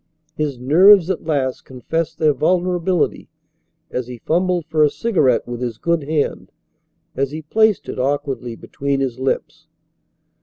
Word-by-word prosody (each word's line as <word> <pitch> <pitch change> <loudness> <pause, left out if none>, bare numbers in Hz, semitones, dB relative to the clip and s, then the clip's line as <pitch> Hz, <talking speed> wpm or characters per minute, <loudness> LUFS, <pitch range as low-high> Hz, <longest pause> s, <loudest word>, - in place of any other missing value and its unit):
His 150 -4 -2
nerves 175 +8 +6
at 180 - -4
last 140 -5 -1
confessed 150 +6 -4
their 155 -2 +3
vulnerability 180 +2 0 0.6
as 125 -1 -3
he 125 -1 -8
fumbled 175 +5 0
for 155 -1 +2
a 150 - +5
cigarette 150 - +1
with 120 0 -6
his 120 -3 -3
good 170 +1 -1
hand, 150 -1 -2 0.6
as 140 0 0
he 155 +2 -7
placed 220 +6 +2
it - - -5
awkwardly 135 -3 -2
between 140 +3 -3
his 130 -2 -2
lips. 130 0 -3
150 Hz, 145 wpm, -20 LUFS, 130-170 Hz, 0.6 s, nerves